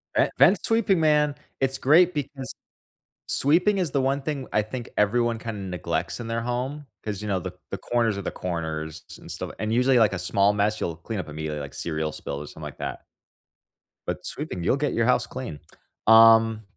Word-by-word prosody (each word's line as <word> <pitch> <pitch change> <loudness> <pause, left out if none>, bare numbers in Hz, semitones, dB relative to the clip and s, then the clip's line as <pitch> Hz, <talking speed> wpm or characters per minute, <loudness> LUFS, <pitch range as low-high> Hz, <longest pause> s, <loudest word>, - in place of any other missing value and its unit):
Vent - - +3
vent-sweeping, 225 -5 +4
man, 150 -2 +3 0.2
it's 135 0 0
great 170 +7 +5
because 140 -2 -5 0.7
sweeping 180 +8 +3
is 175 -6 -1
the 140 -1 +1
one 135 +2 0
thing 140 -2 -4
I 105 - +4
think 120 +3 -6
everyone 115 +2 +2
kinda 110 -3 -5
neglects 90 +2 -3
in 120 - -6
their 115 0 -2
home, 125 +5 -3 0.2
'cause, 105 -2 -4
you 105 - -5
know, 95 -2 0
the 90 0 -6 0.2
the 100 - -2
corners 115 +1 0
of 100 - -5
the - - -2
corners 80 -3 -4 0.2
and - - -10
stuff, - - -5
and 110 +1 -1
usually, 125 +2 +4
like, 110 -3 +4
a 95 - -3
small 100 +3 +2
mess, 105 +1 0
you'll 85 -2 -2
clean 105 +5 -5
up 90 - -5
immediately, 75 0 -4
like 70 -1 -7
cereal 80 -1 -3
spill 70 -1 -6
or 75 - -7
something - - -12
like - - -7
that. - - -5 1.0
But - - -4
sweeping, 90 - -5
you'll 130 - +2
get 145 0 -1
your 115 - +1
house 125 - +3
clean. 125 - -6 0.5
Um, 115 0 +7
115 Hz, 195 wpm, -25 LUFS, 95-135 Hz, 1.0 s, Um